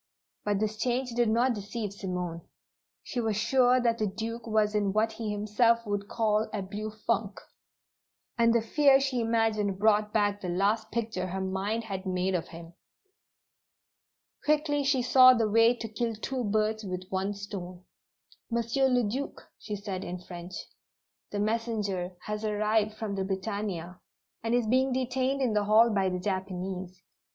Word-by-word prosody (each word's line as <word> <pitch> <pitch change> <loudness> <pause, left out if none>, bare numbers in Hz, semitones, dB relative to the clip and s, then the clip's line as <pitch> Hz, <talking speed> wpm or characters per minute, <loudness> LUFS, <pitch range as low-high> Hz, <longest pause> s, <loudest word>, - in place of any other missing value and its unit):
But 205 -1 0
this 215 0 -1
change 250 +2 -1
did 240 -1 +2
not 240 +3 +3
deceive 205 0 -5
Simone. 180 -4 -4 0.6
She 250 -6 -3
was 220 -3 0
sure 250 +3 +4
that 235 -2 +1
the 215 - +1
Duke 225 +3 -5
was 215 -1 +2
in 205 -2 +1
what 220 +1 +2
he 220 -1 -5
himself 230 +3 +2
would 205 -1 -2
call 215 -1 +1
a 205 -2 -3
"blue 210 +3 -5
funk," 215 -1 -2 1.0
and 230 -1 +4
the 230 -1 +2
fear 275 +3 +5
she 270 -2 0
imagined 225 -3 +1
brought 210 0 +3
back 205 -1 +1
the 180 - -4
last 205 +5 +1
picture 220 -6 -2
her 190 +1 -4
mind 190 +4 -2
had 195 -3 -5
made 185 +1 0
of 175 -3 -1
him. 165 0 -11 1.7
Quickly 300 -1 +2
she 270 -2 +2
saw 255 +1 +8
the 225 -2 +2
way 230 +3 +5
to 230 -1 -6
kill 225 +1 -2
two 250 +3 -3
birds 215 +1 0
with 185 -2 -4
one 195 +2 -1
stone. 185 -3 -7 0.7
"Monsieur 235 +3 +1
le 250 -2 +2
Duc," 255 +7 -4
she 210 - -5
said 200 -2 -5
in 180 - -5
French. 175 0 -9 0.7
"The 205 - -3
messenger 210 -4 -1
has 210 0 -4
arrived 215 0 +1
from 215 -2 -4
the 195 -1 -1
Britannia, 190 -2 -4 0.4
and 230 +1 0
is 245 -2 +2
being 260 +3 +2
detained 260 +1 0
in 240 -4 +1
the 210 -1 +1
hall 220 +3 +5
by 195 -2 +2
the 180 0 -2
Japanese. 185 -1 -4
215 Hz, 165 wpm, -29 LUFS, 195-230 Hz, 1.7 s, saw